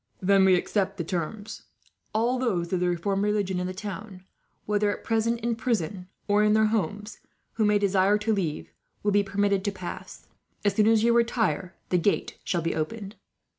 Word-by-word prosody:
"Then 195 Hz, 0 st, +4 dB
we 190 Hz, -1 st, +6 dB
accept 195 Hz, +2 st, -1 dB
the 170 Hz, -, -2 dB
terms. 195 Hz, +5 st, -4 dB, 0.5 s
All 235 Hz, +4 st, +1 dB
those 190 Hz, -9 st, -1 dB
of 185 Hz, -, +2 dB
the 180 Hz, 0 st, +1 dB
reformed 195 Hz, +3 st, -1 dB
religion 205 Hz, -3 st, 0 dB
in 180 Hz, -, -2 dB
the -, -, -3 dB
town, 200 Hz, -1 st, -7 dB, 0.4 s
whether 210 Hz, 0 st, +1 dB
at 205 Hz, -, -4 dB
present 230 Hz, +1 st, 0 dB
in 235 Hz, 0 st, 0 dB
prison 200 Hz, -6 st, -2 dB, 0.2 s
or 205 Hz, 0 st, +3 dB
in 210 Hz, 0 st, +4 dB
their 220 Hz, 0 st, +4 dB
homes, 210 Hz, +1 st, -2 dB, 0.3 s
who 220 Hz, -, +1 dB
may 210 Hz, 0 st, +4 dB
desire 200 Hz, 0 st, +3 dB
to 215 Hz, +1 st, 0 dB
leave, 170 Hz, -7 st, -3 dB, 0.3 s
will 205 Hz, -, +2 dB
be 205 Hz, 0 st, +4 dB
permitted 200 Hz, 0 st, 0 dB
to 205 Hz, -, +1 dB
pass. 185 Hz, -3 st, -8 dB, 0.4 s
As 205 Hz, -, +3 dB
soon 215 Hz, +1 st, +3 dB
as 225 Hz, -1 st, +4 dB
you 235 Hz, 0 st, +4 dB
retire, 225 Hz, -7 st, +1 dB
the 180 Hz, -, +2 dB
gate 200 Hz, +4 st, 0 dB
shall 175 Hz, -3 st, -1 dB
be 165 Hz, -, 0 dB
opened." 200 Hz, +6 st, -4 dB
205 Hz, 190 wpm, -26 LUFS, 185-215 Hz, 0.5 s, we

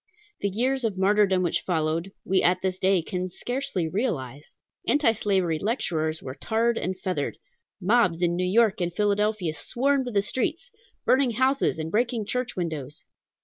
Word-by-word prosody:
The 200 Hz, -, 0 dB
years 255 Hz, +6 st, 0 dB
of 215 Hz, -4 st, -1 dB
martyrdom 195 Hz, -1 st, +3 dB
which 175 Hz, -, 0 dB
followed, 165 Hz, +1 st, -1 dB
we 190 Hz, 0 st, +2 dB
at 180 Hz, +1 st, +2 dB
this 185 Hz, -1 st, -1 dB
day 190 Hz, -2 st, +3 dB
can 185 Hz, +2 st, -3 dB
scarcely 245 Hz, -4 st, -3 dB
realize. 150 Hz, -, -3 dB, 0.3 s
Anti 290 Hz, -5 st, +4 dB
slavery 190 Hz, -7 st, 0 dB
lecturers 160 Hz, -8 st, -1 dB
were 130 Hz, -, -5 dB
tarred 225 Hz, -, 0 dB
and 185 Hz, +1 st, -3 dB
feathered. 180 Hz, -7 st, -2 dB, 0.4 s
Mobs 185 Hz, -4 st, +2 dB
in 170 Hz, 0 st, +2 dB
New 180 Hz, -, 0 dB
York 215 Hz, 0 st, +3 dB
and 175 Hz, 0 st, 0 dB
Philadelphia 205 Hz, -2 st, 0 dB
swarmed 265 Hz, -, 0 dB
the 200 Hz, -2 st, +2 dB
streets, 310 Hz, -, -2 dB, 0.3 s
burning 260 Hz, -2 st, +3 dB
houses 260 Hz, -, +2 dB
and 160 Hz, 0 st, -4 dB
breaking 230 Hz, 0 st, 0 dB
church 250 Hz, +3 st, -2 dB
windows. 155 Hz, -5 st, -5 dB
195 Hz, 155 wpm, -26 LUFS, 170-235 Hz, 0.4 s, Anti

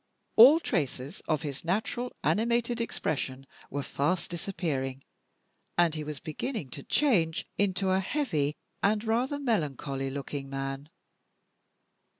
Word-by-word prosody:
All 265 Hz, +8 st, +10 dB
traces 145 Hz, -, -2 dB
of 155 Hz, -1 st, +1 dB
his 140 Hz, -3 st, -5 dB
natural 220 Hz, +7 st, -1 dB
animated 235 Hz, +1 st, +2 dB
expression 135 Hz, -, -2 dB, 0.2 s
were 145 Hz, 0 st, -2 dB
fast 170 Hz, +8 st, -1 dB
disappearing, 145 Hz, -7 st, -3 dB, 0.7 s
and 170 Hz, -2 st, +4 dB
he 155 Hz, -1 st, -3 dB
was 150 Hz, -2 st, -5 dB
beginning 160 Hz, -, -4 dB
to 140 Hz, -, -5 dB
change 170 Hz, -, +2 dB
into 195 Hz, -1 st, +2 dB
a 190 Hz, -, +4 dB
heavy 165 Hz, -, 0 dB, 0.3 s
and 210 Hz, +1 st, +2 dB
rather 240 Hz, +5 st, +1 dB
melancholy 145 Hz, -, -1 dB
looking 140 Hz, 0 st, -5 dB
man. 135 Hz, +1 st, -4 dB
165 Hz, 120 wpm, -29 LUFS, 140-220 Hz, 0.7 s, All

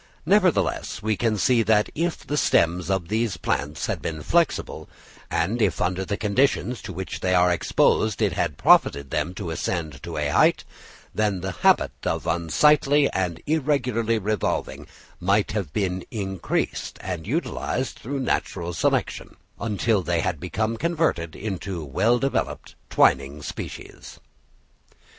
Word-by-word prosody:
Nevertheless 185 Hz, -, +2 dB
we 110 Hz, 0 st, +1 dB
can 110 Hz, +2 st, 0 dB
see 120 Hz, +2 st, +3 dB
that 110 Hz, -1 st, +2 dB
if 170 Hz, +2 st, -2 dB
the 145 Hz, -, -2 dB
stems 90 Hz, -, +2 dB
of 95 Hz, -3 st, 0 dB
these 110 Hz, -2 st, -1 dB
plants 75 Hz, -1 st, -2 dB
had -, -, -3 dB
been 80 Hz, -2 st, -4 dB
flexible, -, -, 0 dB, 0.4 s
and -, -, 0 dB
if -, -, +1 dB
under 95 Hz, +1 st, 0 dB
the 100 Hz, +2 st, -3 dB
conditions 125 Hz, +3 st, +1 dB
to 100 Hz, -, -7 dB
which 95 Hz, +1 st, -5 dB
they 90 Hz, 0 st, +1 dB
are 90 Hz, 0 st, +4 dB
exposed 105 Hz, +4 st, +2 dB
it -, -, +1 dB
had 75 Hz, -, -1 dB
profited 70 Hz, -1 st, +4 dB
them 90 Hz, -, -1 dB
to 90 Hz, -4 st, -5 dB
ascend 80 Hz, -4 st, -3 dB
to -, -, -6 dB
a -, -, 0 dB
height, -, -, +3 dB, 0.5 s
then 105 Hz, -4 st, 0 dB
the 95 Hz, +1 st, -3 dB
habit -, -, +3 dB
of -, -, -2 dB, 0.2 s
slightly 145 Hz, -, +4 dB
and 90 Hz, -3 st, -2 dB
irregularly 130 Hz, -7 st, +1 dB
revolving 105 Hz, -1 st, -2 dB, 0.3 s
might 100 Hz, +3 st, +1 dB
have 100 Hz, -8 st, -3 dB
been 95 Hz, -1 st, -1 dB
increased 95 Hz, -4 st, -3 dB
and 90 Hz, -2 st, -5 dB
utilised 135 Hz, -3 st, -2 dB
through 135 Hz, +3 st, -4 dB
natural 85 Hz, -8 st, -2 dB
selection, 80 Hz, -, -1 dB, 0.2 s
until 110 Hz, -1 st, +1 dB
they 85 Hz, -2 st, 0 dB
had 90 Hz, -4 st, -2 dB
become 110 Hz, +7 st, -2 dB
converted 155 Hz, -, 0 dB
into 95 Hz, -5 st, -4 dB
well 110 Hz, -, +2 dB
developed 135 Hz, +2 st, -2 dB, 0.2 s
twining 70 Hz, +2 st, +2 dB
species. -, -, -8 dB
100 Hz, 145 wpm, -24 LUFS, 90-115 Hz, 0.5 s, are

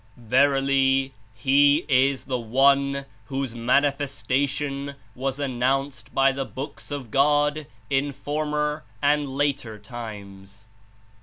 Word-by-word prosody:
Verily, 135 Hz, +2 st, +2 dB, 0.2 s
He 140 Hz, +6 st, +4 dB
is 135 Hz, -1 st, +2 dB
the 125 Hz, -2 st, -2 dB
One 140 Hz, +3 st, +2 dB, 0.2 s
whose 135 Hz, 0 st, -3 dB
Mani 125 Hz, +5 st, +3 dB
festation 140 Hz, +1 st, -2 dB, 0.2 s
was 135 Hz, +2 st, -3 dB
announced 135 Hz, -2 st, -1 dB
by 135 Hz, 0 st, +3 dB
the 135 Hz, 0 st, -3 dB
Books 135 Hz, +2 st, -8 dB
of 140 Hz, -6 st, -6 dB
God 145 Hz, +2 st, +2 dB, 0.2 s
in 140 Hz, +2 st, 0 dB
former 150 Hz, +1 st, -2 dB, 0.2 s
and 145 Hz, +1 st, +2 dB
later 140 Hz, -6 st, -1 dB
times. 100 Hz, -3 st, -10 dB
135 Hz, 105 wpm, -24 LUFS, 125-145 Hz, 0.2 s, He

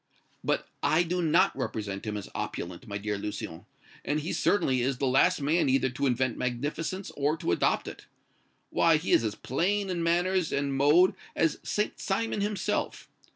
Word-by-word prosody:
"But -, -, 0 dB
I 160 Hz, +3 st, +3 dB
do 180 Hz, +1 st, -1 dB
not 170 Hz, +4 st, +3 dB
represent 105 Hz, -7 st, -4 dB
him 105 Hz, -1 st, -3 dB
as 100 Hz, -, -6 dB
opulent, 90 Hz, +7 st, -5 dB
my 100 Hz, -1 st, -3 dB
dear 105 Hz, 0 st, -3 dB
Lucien; 100 Hz, -5 st, -6 dB, 0.4 s
and 150 Hz, +1 st, 0 dB
he 160 Hz, -, -3 dB
certainly 130 Hz, -11 st, +2 dB
is 130 Hz, +1 st, 0 dB
the 135 Hz, -, -1 dB
last 140 Hz, +5 st, +3 dB
man 155 Hz, 0 st, +2 dB
either 130 Hz, -1 st, +2 dB
to 140 Hz, +3 st, -1 dB
invent 125 Hz, -1 st, 0 dB
magnificence 150 Hz, +9 st, -3 dB
or 145 Hz, +3 st, +1 dB
to 150 Hz, -, -1 dB
adopt -, -, +1 dB
it. -, -, -9 dB, 0.6 s
Why, 165 Hz, -2 st, +4 dB
he 160 Hz, -, -3 dB
is -, -, +5 dB
as 110 Hz, -2 st, -2 dB
plain 190 Hz, +8 st, -1 dB
in 175 Hz, -2 st, -2 dB
manners 175 Hz, +1 st, +1 dB
and 140 Hz, -1 st, -1 dB
mode 150 Hz, +7 st, +5 dB, 0.2 s
as 160 Hz, -2 st, +1 dB
St. 210 Hz, -, -2 dB
Simon 210 Hz, +1 st, -1 dB
himself. 205 Hz, 0 st, -2 dB
145 Hz, 175 wpm, -28 LUFS, 125-175 Hz, 0.6 s, is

